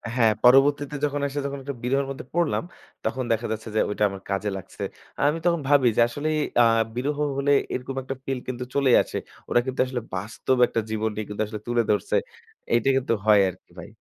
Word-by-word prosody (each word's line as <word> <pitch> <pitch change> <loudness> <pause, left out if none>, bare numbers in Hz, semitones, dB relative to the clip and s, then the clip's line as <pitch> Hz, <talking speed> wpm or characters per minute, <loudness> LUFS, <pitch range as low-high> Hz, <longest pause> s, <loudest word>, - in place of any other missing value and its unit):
হ্যাঁ। 115 -3 +4
পরবর্তীতে 140 +3 +5
যখন 145 0 -2
এসে 140 +1 -4
যখন 140 0 -4
একটা 140 0 -5
বিরহের 135 +2 +1
মধ্যে 135 - -7
পড়লাম। 170 -1 +1 0.4
তখন 130 +4 -1
দেখা 115 +1 0
যাচ্ছে 110 +1 -4
যে - - +3
ঐটা 105 - -1
আমার 95 0 -8
কাজে 100 +2 -1
লাগছে। 95 - -8 0.4
আ - - -1
আমি 165 +2 -2
তখন 170 -2 +3
ভাবি 140 -3 +5
যে - - +5
আসলেই 155 +5 -2 0.2
আ - - +7 0.3
বিরহ 145 +4 -1 0.2
হলে 140 +1 +1 0.2
এরকম 130 +1 -4
একটা 135 +1 -5
feel 135 -1 -2
কিন্তু 125 -1 -4
চলেই 140 -3 +4
আসে। - - -6 0.3
ওরা 120 - +4
কিন্তু 130 0 -5
আসলে 125 -2 -4
বাস্তব 110 +6 -1
একটা 115 - -1
জীবনটাই 110 -1 -2
কিন্তু 105 +1 -4
আসলে 105 -1 -7
তুলে 120 -1 +2
ধরছে। 105 - 0 0.6
এইটা 120 +3 +3
কিন্তু 130 -3 0
হয় 105 -2 +6
আরকি - - -13
ভাই। - - -9
125 Hz, 200 wpm, -25 LUFS, 110-140 Hz, 0.6 s, আ